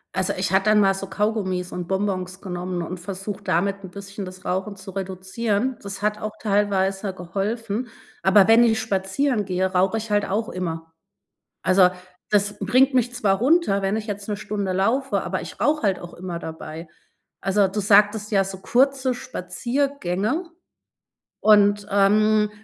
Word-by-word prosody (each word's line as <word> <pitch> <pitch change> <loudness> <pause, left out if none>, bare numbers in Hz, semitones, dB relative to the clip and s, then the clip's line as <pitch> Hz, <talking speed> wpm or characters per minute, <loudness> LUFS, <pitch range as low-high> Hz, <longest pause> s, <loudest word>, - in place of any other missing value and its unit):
Also, 190 - 0
ich 185 0 -1
hatte 195 +2 +3
dann 215 0 +5
mal 195 -1 +4
so 195 0 -6
Kaugummis 190 -4 -1
und 175 -1 -5
Bonbons 190 -1 -2
genommen 180 -1 -4
und 175 +1 -5
versucht, 195 +2 -6
damit 195 +4 0
'n 190 - -8
bisschen 200 +1 -8
das 185 0 -10
Rauchen 195 +2 -2
zu 190 0 -10
reduzieren. 200 +6 -2
Das 200 0 -7
hat 210 0 -1
auch 215 - -3
teilweise 195 -1 0
geholfen, 205 +6 -3 0.3
aber 190 0 +6
wenn 225 +1 +7
ich 220 -2 +3
spazieren 210 +5 0
gehe, 185 -1 -1
rauche 185 +3 +1
ich 220 -1 -5
halt 205 0 +2
auch 215 +3 -1
immer. 165 -5 -5 0.7
Also, 185 -1 +5 0.4
das 205 0 +1
bringt 255 +7 +3
mich 245 -1 +1
zwar 200 -5 +2
runter, 265 - +3
wenn 195 +2 0
ich 220 0 -5
jetzt 205 0 -5
'ne 210 - -1
Stunde 205 -2 -3
laufe, 235 +9 +1
aber - - -3
ich - - -10
rauche 300 0 +2
halt 195 -3 +1
auch 175 - -10
immer 175 -1 -6
dabei. 160 0 -8 0.5
Also, 195 0 +2
du 195 +3 -5
sagtest 210 +1 +3
ja 195 -1 +4
so 190 0 -6
kurze 260 +4 +2
Spaziergänge. 255 - -2 0.9
Und, 205 -1 +4
ähm, 210 +2 +3
200 Hz, 165 wpm, -23 LUFS, 190-215 Hz, 0.9 s, wenn